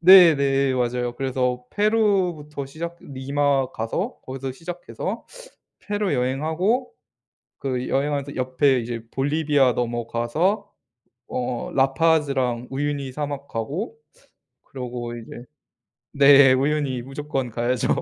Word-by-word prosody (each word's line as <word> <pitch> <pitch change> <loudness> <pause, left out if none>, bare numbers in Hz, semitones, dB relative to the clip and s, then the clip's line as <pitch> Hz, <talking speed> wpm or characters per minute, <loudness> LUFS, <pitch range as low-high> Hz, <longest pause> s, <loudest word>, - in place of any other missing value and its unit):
네네. 140 -7 +7
맞아요. 125 0 -1
그래서 125 -2 -1
페루부터 190 -10 +1
시작 170 +4 -6
리마 135 0 0
가서 170 - -3
거기서 130 0 -5
시작해서 175 +5 -6 0.5
페루 205 -1 -1
여행하고 160 - 0 0.7
그 130 -2 -2
여행하면서 140 0 -1
옆에 130 +1 +2
이제 115 0 -5
볼리비아 145 -2 +2
넘어가서 120 - -1 0.6
어 125 -1 -3
라파즈랑 135 -3 +2
우유니 140 -1 -2
사막 145 -1 -4
가고 160 - -4 0.7
그러고 120 -2 -6
이제 120 +2 -10 0.7
네. 140 -2 +7
우유니 135 -1 0
무조건 135 -2 -4
가야죠. 120 +2 0
135 Hz, 255 characters per minute, -23 LUFS, 125-150 Hz, 0.7 s, 네네